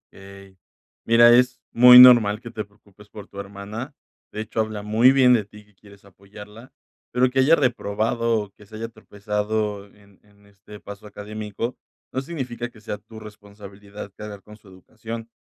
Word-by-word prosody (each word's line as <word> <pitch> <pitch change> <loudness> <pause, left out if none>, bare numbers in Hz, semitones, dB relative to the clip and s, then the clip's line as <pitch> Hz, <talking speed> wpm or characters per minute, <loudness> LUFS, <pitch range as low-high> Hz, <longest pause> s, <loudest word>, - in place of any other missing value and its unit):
Ey, 100 -1 -15 0.5
mira, 120 +1 +6
es 125 0 +3
muy 125 +1 +8
normal 120 -5 +8
que 120 0 -11
te 110 -2 -5
preocupes 105 0 -22
por 105 -2 -12
tu 100 - -12
hermana. 100 +7 -8 0.4
De 105 - -6
hecho, 110 +1 -6
habla 110 -1 -5
muy 110 +5 +4
bien 130 -2 +4
de 115 -3 +2
ti 105 +1 -17
que 105 - -29
quieres 100 +1 -20
apoyarla, 105 +5 -15 0.4
pero 125 0 +1
que 135 - -1
haya 145 +5 +5
reprobado, 115 -3 -1
o, 105 -1 -10
que 105 +1 -20
se 110 - -13
haya 115 +1 -6
tropezado 105 -1 -4
en 100 -1 -24
en 100 -1 -26
este 100 +1 -15
paso 100 +1 -11
académico 105 +3 -7 0.4
no 130 - -2
significa 125 -6 -6
que 115 - -19
sea 105 -1 -7
tu 110 +2 -14
responsabilidad 100 -1 -12
cargar 105 -1 -10
con 105 - -15
su 105 -1 -22
educación. 115 +4 -10
105 Hz, 175 wpm, -22 LUFS, 100-115 Hz, 0.5 s, muy